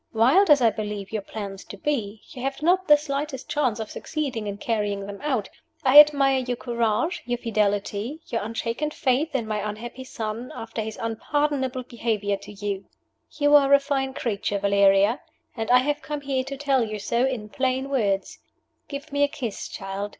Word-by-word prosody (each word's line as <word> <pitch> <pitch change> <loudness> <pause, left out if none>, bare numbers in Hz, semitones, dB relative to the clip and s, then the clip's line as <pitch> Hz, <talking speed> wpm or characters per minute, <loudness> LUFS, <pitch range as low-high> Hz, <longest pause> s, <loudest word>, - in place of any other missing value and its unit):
Wild 270 - +5
as 285 -4 +6
I 225 - +5
believe 210 -2 -5
your 220 -2 -2
plans 200 -1 -7
to 200 - -9
be 220 -5 -2
you 250 - -8
have 275 +3 -3
not 370 +3 +3
the 295 -1 +8
slightest 280 -2 -4
chance 255 -7 0
of 220 - -5
succeeding 270 -9 -3
in 200 0 -4
carrying 205 -3 -1
them 200 0 -8
out 265 -8 -1 0.4
I 270 +2 +9
admire 280 -3 +6
your 250 -1 -3
courage, 235 +8 0
your 245 0 0
fidelity, 210 +4 -1
your 230 - -2
unshaken 230 +6 -2
faith 300 0 0
in 235 -4 0
my 215 -1 -2
unhappy 220 +5 -5
son, 230 -1 -5
after 225 0 -5
his 220 0 -5
unpardonable 260 +3 -1
behavior 220 -4 -1
to 200 +1 -12
you. 200 -1 -4 0.5
You 290 0 +3
are 280 -1 +7
a - - +4
fine 270 -1 -2
creature, 205 -5 -1
Valeria, 200 +3 +4 0.3
and 225 -2 -3
I 250 - +7
have 290 +3 0
come 295 -1 -5
here 270 -2 -1
to 275 0 -6
tell 270 -3 +2
you 215 -1 -4
so 235 +4 0
in 240 -6 -3
plain 260 +2 -1
words. 205 -8 -1 0.5
Give 280 +1 -7
me 285 0 0
a 285 - +5
kiss, 265 -8 -5
child. 195 +1 -5
240 Hz, 185 wpm, -25 LUFS, 210-280 Hz, 0.5 s, I